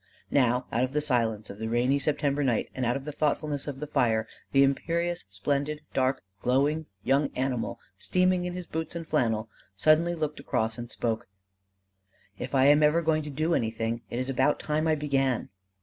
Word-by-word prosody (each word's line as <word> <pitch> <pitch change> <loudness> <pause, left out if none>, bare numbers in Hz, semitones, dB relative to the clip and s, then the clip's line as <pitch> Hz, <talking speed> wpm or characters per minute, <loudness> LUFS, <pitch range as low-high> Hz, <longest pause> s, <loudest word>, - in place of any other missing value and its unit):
Now 125 -2 +3
out 120 +3 +1
of 130 +1 -2
the 150 - +2
silence 115 -8 0
of 100 - -11
the 110 - -3
rainy 125 +4 +2
September 145 0 0
night 120 -5 0
and 130 -2 -1
out 120 - +1
of 135 - -9
the 150 - -4
thoughtfulness 150 -1 -1
of 140 -2 -5
the 150 - -3
fire, 115 -7 +1 0.2
the 135 0 +6
imperious 170 +4 0
splendid 140 +9 -1
dark 130 -2 +1 0.2
glowing 145 +5 +1 0.2
young 140 +2 +2
animal 130 -2 -2 0.2
steaming 185 0 +2
in 180 0 -4
his 180 -1 -5
boots 160 +1 -4
and 165 -1 -5
flannel 110 -2 +1 0.3
suddenly 155 +9 +3
looked 155 -2 -3
across 115 -2 -1
and 120 0 -6
spoke: 115 0 -2 1.1
"If - - -4
I 130 0 +5
am 145 +2 +6
ever 150 +3 +4
going 155 -1 +2
to 150 - -6
do 155 +4 0
anything, 115 -2 -1
it - - -4
is 130 +1 -1
about 135 +3 +2
time 155 +1 0
I 160 - +3
began." 135 -4 0
140 Hz, 190 wpm, -28 LUFS, 120-155 Hz, 1.1 s, the